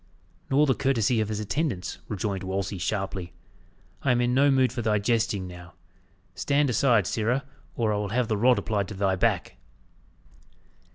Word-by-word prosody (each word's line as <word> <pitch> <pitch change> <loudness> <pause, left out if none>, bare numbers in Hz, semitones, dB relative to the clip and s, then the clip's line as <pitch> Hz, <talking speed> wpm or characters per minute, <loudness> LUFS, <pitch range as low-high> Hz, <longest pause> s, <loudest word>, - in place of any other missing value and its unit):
"Nor 145 +3 +4
the 135 - +3
courtesy 125 -4 +1
of 110 - -2
his 105 -1 -2
attendants," 110 - -2
rejoined 100 -2 -3
Wolsey 95 0 -3
sharply. 95 0 -3 0.7
"I 140 - 0
am 120 - +2
in 120 0 +1
no 140 +2 +4
mood 130 -3 +3
for 125 - -3
thy 110 -2 +2
jesting 110 -2 0
now. 90 -1 -11 0.6
Stand 140 +7 +1
aside, 115 -5 +3
sirrah, 120 +7 0 0.3
or 110 -3 +1
I - - 0
will 105 -1 -2
have 120 +2 0
the 110 - 0
rod 120 +4 +4
applied 100 -3 -1
to 105 - -7
thy 95 -1 +1
back!" 90 - 0
110 Hz, 170 wpm, -26 LUFS, 100-125 Hz, 0.7 s, Nor